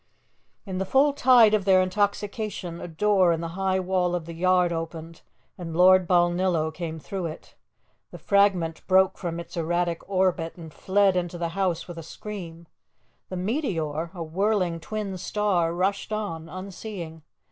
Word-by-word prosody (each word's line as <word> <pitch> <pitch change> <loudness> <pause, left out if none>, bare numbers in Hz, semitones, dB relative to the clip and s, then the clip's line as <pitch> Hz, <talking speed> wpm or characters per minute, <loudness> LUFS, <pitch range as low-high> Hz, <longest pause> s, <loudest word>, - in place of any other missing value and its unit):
In 190 -2 -4
the 190 - -1
full 275 +7 +3
tide 245 -6 +6
of 210 -2 +2
their 190 -1 +5
intoxication, 200 -1 -2
a - - -5
door 185 +1 +3
in 165 - 0
the 165 0 -4
high 190 +2 0
wall 180 -1 0
of 170 -2 -4
the 170 - -7
yard 180 0 +2
opened 165 0 -6 0.4
and 165 -2 -5
Lord 185 0 +6
Balnillo 175 -2 +2
came 165 -1 -5
through 180 +2 -4
it. 155 - -10 0.6
The - - -10
fragment 190 -5 +2
broke 190 0 +3
from 170 -2 -4
its 170 - -9
erratic 170 0 -1
orbit 185 -4 0
and 160 -3 -11
fled 195 0 +2
into 175 -1 -2
the 170 -1 -2
house 180 -1 -1
with 175 -2 -8
a - - -6
scream; 170 -1 -8 0.6
the 185 - -5
meteor, 175 - -2
a 170 - -4
whirling 180 0 0
twin 195 +1 -5
star, 185 -4 0
rushed 195 +5 -1
on, 165 -7 -4
unseeing. 185 -3 -7
180 Hz, 160 wpm, -25 LUFS, 165-195 Hz, 0.6 s, tide